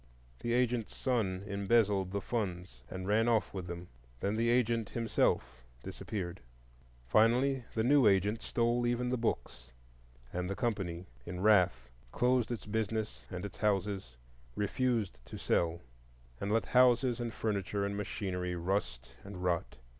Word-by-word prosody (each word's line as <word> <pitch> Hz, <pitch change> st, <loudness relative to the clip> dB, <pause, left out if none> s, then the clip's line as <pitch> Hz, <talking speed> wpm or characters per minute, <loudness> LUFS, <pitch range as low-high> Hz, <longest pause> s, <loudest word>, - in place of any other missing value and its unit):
The 120 Hz, -, -1 dB
agent's 120 Hz, -2 st, +1 dB
son 100 Hz, -8 st, 0 dB
embezzled 100 Hz, -1 st, +2 dB
the 100 Hz, +1 st, -2 dB
funds 90 Hz, -, -3 dB
and 95 Hz, 0 st, -5 dB
ran 110 Hz, +3 st, +3 dB
off 115 Hz, -2 st, +2 dB
with 95 Hz, -3 st, -5 dB
them. 85 Hz, 0 st, -6 dB, 0.3 s
Then 100 Hz, +7 st, 0 dB
the 115 Hz, +1 st, +2 dB
agent 115 Hz, -3 st, +2 dB
himself 65 Hz, -, 0 dB, 0.2 s
disappeared. 90 Hz, -5 st, -5 dB, 0.6 s
Finally 120 Hz, -, +3 dB
the 110 Hz, -, +2 dB
new 135 Hz, -1 st, +5 dB
agent 100 Hz, +3 st, +3 dB
stole 120 Hz, +1 st, +1 dB
even 120 Hz, +1 st, 0 dB
the 125 Hz, -, +1 dB
books, 65 Hz, -, -3 dB, 0.6 s
and 90 Hz, +1 st, -2 dB
the 100 Hz, -, -2 dB
company 95 Hz, -7 st, -2 dB, 0.2 s
in 90 Hz, +7 st, -6 dB
wrath 90 Hz, -, +4 dB, 0.2 s
closed 125 Hz, -2 st, +2 dB
its 120 Hz, -, -4 dB
business 110 Hz, 0 st, -2 dB
and 90 Hz, 0 st, -5 dB
its 100 Hz, -, -8 dB
houses, 100 Hz, -, 0 dB, 0.4 s
refused 105 Hz, -, 0 dB
to -, -, -8 dB
sell, 85 Hz, 0 st, +1 dB, 0.6 s
and 100 Hz, +1 st, -2 dB
let 115 Hz, +1 st, +2 dB
houses 125 Hz, -1 st, +4 dB
and 120 Hz, -1 st, -2 dB
furniture 100 Hz, -2 st, -1 dB
and 100 Hz, 0 st, -2 dB
machinery 95 Hz, -3 st, -3 dB
rust 85 Hz, -9 st, -2 dB
and 100 Hz, -2 st, -8 dB
rot. 85 Hz, -2 st, 0 dB
105 Hz, 145 wpm, -33 LUFS, 90-115 Hz, 0.6 s, new